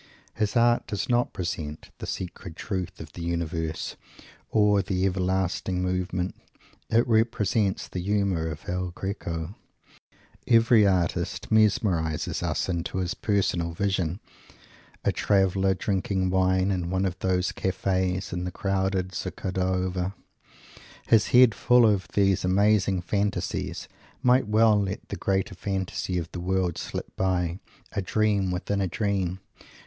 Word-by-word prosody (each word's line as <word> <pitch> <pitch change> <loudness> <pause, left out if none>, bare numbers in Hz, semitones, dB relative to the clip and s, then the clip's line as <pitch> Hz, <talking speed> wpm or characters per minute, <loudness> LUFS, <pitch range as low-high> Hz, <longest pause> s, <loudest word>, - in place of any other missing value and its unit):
His 105 0 -1
art 120 0 +3
does 105 - -3
not 120 0 +3
represent 80 -4 -5
the - - -6
secret 90 -2 -6
Truth 95 -1 -4
of 80 -1 -10
the 85 - -8
Universe, 85 -1 -3 0.5
or 105 -2 +4
the 95 -1 -1
Everlasting 95 -1 0
Movement; 90 0 -1 0.6
it 115 +2 +3
represents 110 -3 +1
the 90 - -5
humour 100 -4 0
of 75 -2 -8
El 90 0 -2
Greco. 85 -2 -4 0.9
Every 115 -2 +5
artist 90 -3 -1
mesmerizes 95 -7 +2
us - - -1
into 85 0 -2
his 90 -2 -1
personal 90 -5 0
vision. 95 -1 -1 0.9
A - - +4
traveller, 95 -1 +2
drinking 95 -1 -1
wine 95 +1 +2
in 90 -3 -1
one 95 +1 0
of 90 -2 -3
those 90 -1 +1
cafes 95 -1 -1
in 90 0 -2
the 90 - -3
crowded 95 -1 -1
Zocodover, 95 +1 -2 0.9
his 110 -2 +4
head 125 -2 +6
full 125 +1 +4
of 100 -4 +2
these 100 -2 +3
amazing 100 0 +3
fantasies, 100 -1 -2 0.4
might 125 -2 +4
well 110 -1 +4
let 100 0 -4
the - - -3
greater 95 -1 -1
fantasy 95 -1 -3
of 85 -1 -4
the 90 - -6
world 90 -1 0
slip - - -6
by 90 -2 0 0.3
a 100 - -2
dream 100 0 +1
within 95 +2 -1
a 95 - +1
dream! 95 -2 -1
95 Hz, 135 wpm, -26 LUFS, 90-100 Hz, 0.9 s, head